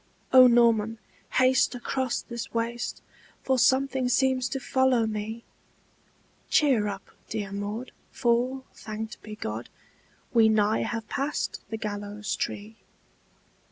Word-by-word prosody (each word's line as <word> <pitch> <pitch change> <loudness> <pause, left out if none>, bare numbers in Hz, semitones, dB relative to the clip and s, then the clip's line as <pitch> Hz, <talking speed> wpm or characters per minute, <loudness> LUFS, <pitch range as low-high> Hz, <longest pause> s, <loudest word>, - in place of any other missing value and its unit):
"O 255 -1 +10
Norman, 230 -2 +3 0.4
haste 255 0 +3
across 255 +1 -2
this 235 -1 -6
waste 235 +1 -2 0.4
For 260 -1 +2
something 260 0 +2
seems 260 0 +2
to 270 - -3
follow 260 -3 +2
me!" 220 +1 -4 1.1
"Cheer 255 -9 +3
up, 195 -1 -6 0.2
dear 205 -3 -4
Maud, 205 +5 -4 0.2
for, 250 +2 0
thanked 215 0 -7
be 215 -1 -8
God, 110 - -5 0.6
We 225 -2 +6
nigh 215 0 +2
have 225 -1 -3
passed 280 +5 -2
the 220 - -3
gallows 205 -1 -4
tree!" 215 +2 -5
230 Hz, 120 wpm, -27 LUFS, 215-255 Hz, 1.1 s, O